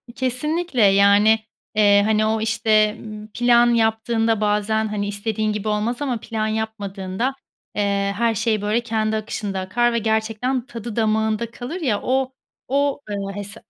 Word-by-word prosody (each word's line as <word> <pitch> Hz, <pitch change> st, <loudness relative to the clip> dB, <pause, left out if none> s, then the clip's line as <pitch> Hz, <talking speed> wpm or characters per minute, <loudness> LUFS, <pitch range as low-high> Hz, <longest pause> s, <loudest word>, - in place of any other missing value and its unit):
Kesinlikle, 265 Hz, +3 st, -1 dB
yani, 200 Hz, +2 st, +5 dB, 0.4 s
eee, 205 Hz, -1 st, +5 dB
hani, 215 Hz, 0 st, +2 dB
o 220 Hz, 0 st, 0 dB
işte, 220 Hz, -1 st, +2 dB
ımm, 215 Hz, -1 st, -9 dB
plan 240 Hz, 0 st, +4 dB
yaptığında 225 Hz, 0 st, +1 dB
bazen, 210 Hz, +1 st, +1 dB
hani, 205 Hz, -1 st, -3 dB
istediğin 215 Hz, +1 st, -2 dB
gibi 210 Hz, 0 st, -4 dB
olmaz 215 Hz, +5 st, -1 dB
ama 255 Hz, -5 st, -1 dB
plan 220 Hz, -1 st, -3 dB
yapmadığında, 215 Hz, +1 st, -3 dB, 0.4 s
eee, 200 Hz, -1 st, 0 dB
her 230 Hz, 0 st, +1 dB
şey 220 Hz, -1 st, 0 dB
böyle 210 Hz, +3 st, +1 dB
kendi 220 Hz, -2 st, -1 dB
akışında 210 Hz, -2 st, -3 dB
akar 235 Hz, +6 st, +1 dB
ve 235 Hz, -, +1 dB
gerçekten 225 Hz, +3 st, -1 dB
tadı 230 Hz, -3 st, -7 dB
damağında 220 Hz, 0 st, 0 dB
kalır 270 Hz, +10 st, -6 dB
ya, 225 Hz, -9 st, 0 dB
o 260 Hz, 0 st, 0 dB, 0.3 s
o, 280 Hz, +2 st, +1 dB
ııı, 200 Hz, -1 st, -3 dB
hes 205 Hz, 0 st, -5 dB
220 Hz, 150 wpm, -21 LUFS, 210-235 Hz, 0.4 s, yani